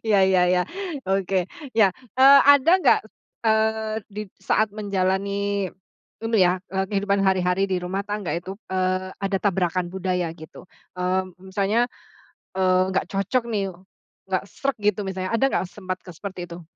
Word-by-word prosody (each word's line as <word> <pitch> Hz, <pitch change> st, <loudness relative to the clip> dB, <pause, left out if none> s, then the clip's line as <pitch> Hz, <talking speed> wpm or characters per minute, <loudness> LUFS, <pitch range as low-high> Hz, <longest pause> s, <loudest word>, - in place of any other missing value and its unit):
Iya 210 Hz, -2 st, +4 dB
ya 185 Hz, -1 st, +4 dB
ya. 180 Hz, 0 st, +3 dB, 0.4 s
Oke. 190 Hz, -1 st, 0 dB, 0.3 s
Ya, 200 Hz, -4 st, +5 dB, 0.2 s
eee, 275 Hz, +2 st, +8 dB
ada 285 Hz, +4 st, +4 dB
nggak, -, -, +5 dB, 0.4 s
eee, 220 Hz, 0 st, +2 dB, 0.2 s
di 210 Hz, +1 st, -6 dB, 0.2 s
saat 215 Hz, -1 st, +1 dB
menjalani, 200 Hz, -1 st, -1 dB, 0.6 s
ini 225 Hz, 0 st, +1 dB
ya, 180 Hz, 0 st, +4 dB, 0.2 s
eee, 190 Hz, 0 st, 0 dB
kehidupan 200 Hz, -1 st, +1 dB
hari-hari 190 Hz, +1 st, +2 dB
di 185 Hz, -, 0 dB
rumah 190 Hz, +2 st, -2 dB
tangga 205 Hz, -3 st, -3 dB
itu, 185 Hz, +3 st, -4 dB, 0.2 s
eee, 185 Hz, 0 st, 0 dB
ada 195 Hz, 0 st, 0 dB
tabrakan 180 Hz, -2 st, 0 dB
budaya, 180 Hz, -3 st, -1 dB
gitu? 160 Hz, 0 st, -12 dB, 0.3 s
Mmm, 185 Hz, 0 st, -1 dB, 0.2 s
misalnya, 210 Hz, +5 st, +2 dB, 0.7 s
eee, 185 Hz, -1 st, +3 dB
nggak -, -, +1 dB
cocok 200 Hz, +6 st, 0 dB
nih, 195 Hz, -4 st, -1 dB, 0.6 s
nggak -, -, 0 dB
sreg 275 Hz, -2 st, -3 dB
gitu 210 Hz, 0 st, +1 dB
misalnya. 185 Hz, +1 st, -3 dB
Ada 230 Hz, +4 st, +3 dB
nggak, -, -, 0 dB
sempat 185 Hz, -3 st, -4 dB
ke 180 Hz, -, -9 dB
seperti 185 Hz, 0 st, -7 dB
itu? 175 Hz, 0 st, -9 dB
190 Hz, 150 wpm, -24 LUFS, 185-205 Hz, 0.7 s, eee